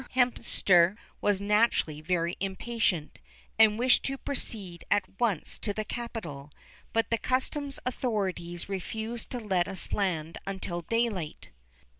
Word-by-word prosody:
Hemster 200 Hz, -7 st, +4 dB, 0.2 s
was 205 Hz, -2 st, +2 dB
naturally 205 Hz, -7 st, +2 dB
very 170 Hz, +1 st, 0 dB
impatient, 195 Hz, -5 st, -1 dB, 0.4 s
and 215 Hz, -1 st, +7 dB
wished 250 Hz, +2 st, +5 dB
to 270 Hz, 0 st, -1 dB
proceed 205 Hz, -11 st, -1 dB
at 205 Hz, -1 st, +4 dB, 0.2 s
once 220 Hz, -9 st, 0 dB
to 205 Hz, -2 st, 0 dB
the 215 Hz, -, -2 dB
capital, 185 Hz, -14 st, -5 dB, 0.4 s
but 225 Hz, +1 st, +1 dB
the 230 Hz, -, +2 dB
customs 275 Hz, +2 st, 0 dB
authorities 195 Hz, -9 st, -1 dB
refused 220 Hz, +4 st, -3 dB
to 250 Hz, -, -3 dB
let 190 Hz, -6 st, +1 dB
us 195 Hz, -2 st, -2 dB
land 165 Hz, -5 st, -1 dB
until 190 Hz, -3 st, -3 dB
daylight. 215 Hz, -5 st, -1 dB
205 Hz, 125 wpm, -29 LUFS, 175-230 Hz, 0.4 s, and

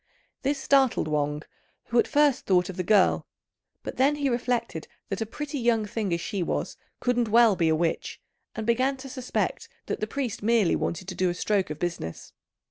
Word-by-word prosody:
This 280 Hz, +1 st, 0 dB
startled 270 Hz, -, +3 dB
Wang, 150 Hz, 0 st, -1 dB, 0.5 s
who 235 Hz, -, +3 dB
at -, -, +3 dB
first 290 Hz, -2 st, +2 dB
thought 180 Hz, -1 st, +3 dB
of 190 Hz, -, -6 dB
the 185 Hz, -, -2 dB
girl; 195 Hz, +1 st, +3 dB, 0.6 s
but -, -, -6 dB
then 275 Hz, +3 st, +3 dB
he 285 Hz, -2 st, 0 dB
reflected 240 Hz, -8 st, -2 dB, 0.2 s
that 195 Hz, +2 st, -3 dB
a 220 Hz, -, -1 dB
pretty 290 Hz, +4 st, -5 dB
young 230 Hz, -3 st, +2 dB
thing 210 Hz, -2 st, -3 dB
as 170 Hz, -, +1 dB
she 195 Hz, +2 st, -3 dB
was 170 Hz, -, -2 dB, 0.2 s
couldn't 245 Hz, -1 st, +1 dB
well 230 Hz, -2 st, +6 dB
be 165 Hz, -3 st, +2 dB
a 160 Hz, -, +3 dB
witch, 165 Hz, +1 st, -2 dB, 0.4 s
and 220 Hz, -, -4 dB
began 255 Hz, +4 st, +2 dB
to 270 Hz, +1 st, -9 dB
suspect 255 Hz, -1 st, -3 dB, 0.2 s
that -, -, -3 dB
the 215 Hz, -, -2 dB
priest 260 Hz, -3 st, -3 dB
merely 220 Hz, -4 st, +3 dB
wanted 180 Hz, +2 st, -3 dB
to 190 Hz, -, -4 dB
do 185 Hz, 0 st, +1 dB
a 175 Hz, -, -2 dB
stroke 195 Hz, 0 st, 0 dB
of 150 Hz, -, -5 dB
business. 170 Hz, -, -5 dB
220 Hz, 200 wpm, -26 LUFS, 180-255 Hz, 0.6 s, well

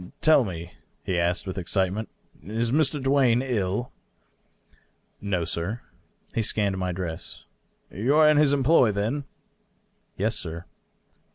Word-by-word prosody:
" -, -, -44 dB
Tell 155 Hz, -4 st, +6 dB
me," 85 Hz, -4 st, -6 dB, 0.3 s
he 90 Hz, -2 st, -1 dB
asked, 85 Hz, +2 st, 0 dB
with 95 Hz, 0 st, -4 dB
excitement. 95 Hz, +4 st, -1 dB, 0.2 s
" -, -, -28 dB
Is 115 Hz, +6 st, -2 dB
Mr. 150 Hz, +1 st, +2 dB
Duane 135 Hz, -3 st, +3 dB
ill 115 Hz, -2 st, -1 dB, 0.6 s
?" -, -, -38 dB
"No, 95 Hz, -4 st, -1 dB
sir." 85 Hz, +8 st, -3 dB, 0.5 s
He 115 Hz, -, +1 dB
scanned 100 Hz, -3 st, 0 dB
my 90 Hz, -1 st, -1 dB
dress. 85 Hz, -3 st, -6 dB, 0.2 s
" -, -, -41 dB
You 120 Hz, +10 st, +1 dB
are 155 Hz, 0 st, +6 dB
in 150 Hz, -1 st, +5 dB
his 150 Hz, -2 st, +5 dB
employ, 135 Hz, -4 st, +4 dB
then 110 Hz, +8 st, -2 dB, 0.5 s
?" -, -, -44 dB
"Yes, 110 Hz, +3 st, 0 dB
sir." 85 Hz, -1 st, -5 dB
105 Hz, 155 wpm, -25 LUFS, 90-130 Hz, 0.6 s, Tell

